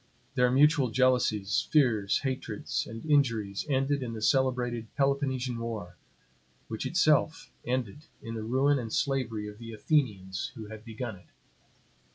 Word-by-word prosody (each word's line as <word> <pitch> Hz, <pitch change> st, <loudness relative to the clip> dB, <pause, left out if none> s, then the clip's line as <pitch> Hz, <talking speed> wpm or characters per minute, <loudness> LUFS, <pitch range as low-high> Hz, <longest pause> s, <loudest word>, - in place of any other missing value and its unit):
Their 125 Hz, 0 st, +3 dB
mutual 140 Hz, 0 st, +4 dB
jealousies, 115 Hz, -5 st, +2 dB
fears, 115 Hz, -10 st, +3 dB
hatreds, 130 Hz, -5 st, -3 dB
and 115 Hz, +4 st, -8 dB
injuries 115 Hz, -8 st, +1 dB
ended 135 Hz, +1 st, +1 dB
in 120 Hz, -3 st, -4 dB
the 110 Hz, -, -6 dB
celebrated 125 Hz, -3 st, +1 dB
Peloponnesian 135 Hz, -3 st, 0 dB
war; 110 Hz, -6 st, -5 dB, 0.7 s
which 110 Hz, +4 st, -3 dB
itself 160 Hz, 0 st, +2 dB, 0.2 s
ended 125 Hz, +3 st, -2 dB
in 115 Hz, -, -7 dB
the 110 Hz, -, -4 dB
ruin 135 Hz, +5 st, +2 dB
and 115 Hz, -3 st, -5 dB
slavery 115 Hz, -7 st, -1 dB
of 105 Hz, +1 st, -10 dB
the 115 Hz, -1 st, -8 dB
Athenians 105 Hz, -, -1 dB
who 110 Hz, -3 st, -7 dB
had 110 Hz, -1 st, -9 dB
begun 110 Hz, -2 st, -6 dB
it. 90 Hz, -, -20 dB
125 Hz, 140 wpm, -29 LUFS, 110-135 Hz, 0.7 s, mutual